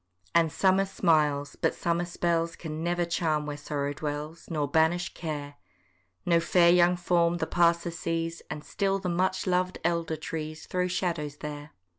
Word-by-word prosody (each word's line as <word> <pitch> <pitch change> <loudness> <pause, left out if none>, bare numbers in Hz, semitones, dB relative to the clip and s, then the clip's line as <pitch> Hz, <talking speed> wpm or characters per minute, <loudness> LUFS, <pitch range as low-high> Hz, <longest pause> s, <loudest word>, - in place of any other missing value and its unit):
And 165 -2 +4
summer 190 +3 +3
smiles, 150 -6 +1
but - - 0
summer 170 +1 0
spells 170 -1 0
Can 160 -1 -6
never 175 0 +1
charm 160 -3 0
where 150 -1 -4
sorrow 145 -1 -3
dwells, 150 +2 -5
Nor 150 -4 -1
banish 160 +4 +2
care. 145 -3 -5 0.7
No 170 -1 +4
fair 170 0 +4
young 175 0 +5
form 175 -1 +2
the - - -1
passer 170 0 +2
sees, 165 0 -3
And 150 - -5
still 195 -1 0
the 190 -2 -3
much 185 +2 0
lov'd 185 0 +1
elder 170 -2 0
trees 155 0 -5
Throw 180 0 -1
shadows 170 -5 -2
there. 150 0 -7
170 Hz, 160 wpm, -28 LUFS, 155-175 Hz, 0.7 s, young